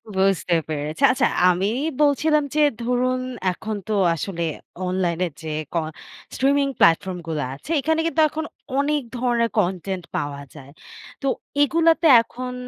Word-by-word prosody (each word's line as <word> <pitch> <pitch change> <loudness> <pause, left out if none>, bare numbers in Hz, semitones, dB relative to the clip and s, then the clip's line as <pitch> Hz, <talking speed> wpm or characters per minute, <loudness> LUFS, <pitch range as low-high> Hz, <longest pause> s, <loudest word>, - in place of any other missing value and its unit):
বুঝতে 190 -2 +1 0.2
পেরেছি 155 - -3
আচ্ছা 255 - +2 0.2
আমি 185 +3 +1 0.3
বলছিলাম 300 +1 +3
যে 305 - +3 0.2
ধরুন 250 +1 0 0.3
এখন 215 +4 -5
তো 215 - -1 0.2
আসলে 170 +1 -4 0.4
অনলাইনে 180 -1 0 0.2
যে 160 - -6 0.2
ক - - -7 0.6
স্ট্রিমিং 280 +1 +2
প্ল্যাটফর্মগুলা 165 -2 +2
আছে 265 - -9
এখানে 320 +4 0
কিন্তু 320 -1 +1
এখন 315 +1 -4 0.3
অনেক 290 +1 +1 0.2
ধরনের 235 -2 +1
কনটেন্ট 185 -1 -2
পাওয়া 140 -1 -4
যায়। 140 -1 -12 0.5
তো 275 - -2 0.3
এগুলাতে 330 +2 +3
এখন 250 +2 -7
230 Hz, 130 wpm, -22 LUFS, 175-280 Hz, 0.6 s, বলছিলাম